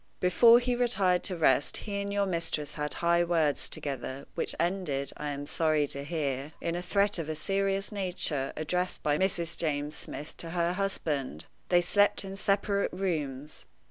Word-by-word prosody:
Before 230 +6 +7
he 245 0 +1
retired 200 -8 +2
to 185 - 0
rest 140 -4 +3
he 200 -1 -3
and 200 0 -3
your 200 0 +1
mistress 165 -5 -2
had 150 -1 -3
high 170 0 +4
words 165 -4 +1
together, 135 -1 -5
which - - -2
ended, 165 -7 -1
I 150 - -4
am 145 0 -4
sorry 155 -1 +2
to 140 - -2
hear, 145 -2 -2
in 170 - -2
a 175 - -2
threat 200 +1 +1
of 160 -2 -4
a 155 - -2
serious 195 +5 -1
nature 180 -8 -2
addressed 180 +4 -1
by 150 0 +2
Mrs. 175 -3 0
James 150 -1 -1
Smith 150 - -8
to 165 - -7
her 170 +1 +2
husband. 150 - -2 0.2
They 175 -1 +5
slept 205 +3 +3
in 195 0 -6
separate 200 0 +1
rooms. 150 -7 -3
170 Hz, 175 wpm, -29 LUFS, 150-195 Hz, 0.2 s, Before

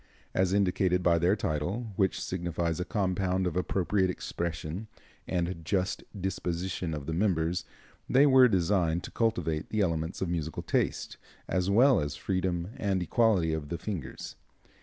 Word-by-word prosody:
As 95 -1 +2
indicated 90 -2 +2
by 85 -1 +4
their 90 +4 +3
title, 100 +4 -2
which 95 -1 +1
signifies 85 -2 -2
a 90 - -1
compound 95 -1 0
of 90 - -1
appropriate 95 +1 +1
expression 85 +2 -4 0.4
and 85 -1 -2
just 95 +2 -1 0.2
disposition 90 -2 -2
of 75 -2 -6
the 80 - -3
members, 85 -2 +1 0.4
they 135 +3 +6
were 130 -2 +7
designed 90 -4 +1
to - - -7
cultivate 110 -9 0
the 110 - 0
elements 80 -2 -1
of 95 - -1
musical 80 -2 -3
taste, - - -1 0.3
as 90 0 0
well 125 +6 +5
as 75 -1 -2
freedom 90 -2 -1
and 95 -3 0
equality 95 -5 +2
of 75 -2 -4
the 85 - -2
fingers. 95 -8 -6
90 Hz, 150 wpm, -29 LUFS, 85-100 Hz, 0.4 s, were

